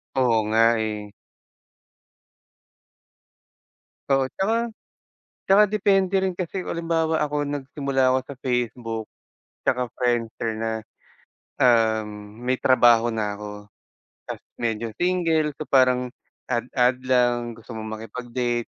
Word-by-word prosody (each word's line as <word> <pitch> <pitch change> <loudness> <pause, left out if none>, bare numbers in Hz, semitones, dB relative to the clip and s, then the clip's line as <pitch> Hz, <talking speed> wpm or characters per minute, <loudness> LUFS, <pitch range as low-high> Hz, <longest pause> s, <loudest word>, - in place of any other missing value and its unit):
Oo 125 -4 +3
nga, 115 +1 +4
eh. 105 -1 -3 3.0
Oo 135 -1 +2
'tsaka, 230 - 0 0.8
tsaka 195 +2 +7
depende 195 -2 +3
rin 190 -1 -1
kasi 185 +1 -3
kung - - -3
halimbawa 165 -1 0
ako 145 -1 -1
nagsimula 140 -2 0
ako 130 - +3
sa 140 - -8
Facebook, 120 -3 -2 0.6
'tsaka 125 -2 +1
Friendster 115 -2 -1
na. 110 +1 -2 0.9
Um, 110 -3 +1
may 130 - +2
trabaho 120 -2 +5
na 105 -2 -1
ako, 105 0 -8 0.6
ta's - - -5 0.2
medyo 115 -1 -1
single 165 -4 +2
so 155 - -5
parang 130 -1 +4 0.4
add-add 125 +1 +1
lang, 120 -2 +2
gusto 115 +1 -11
mong 110 0 -5
makipag-date, 120 +1 -3
125 Hz, 110 wpm, -24 LUFS, 115-145 Hz, 3.0 s, tsaka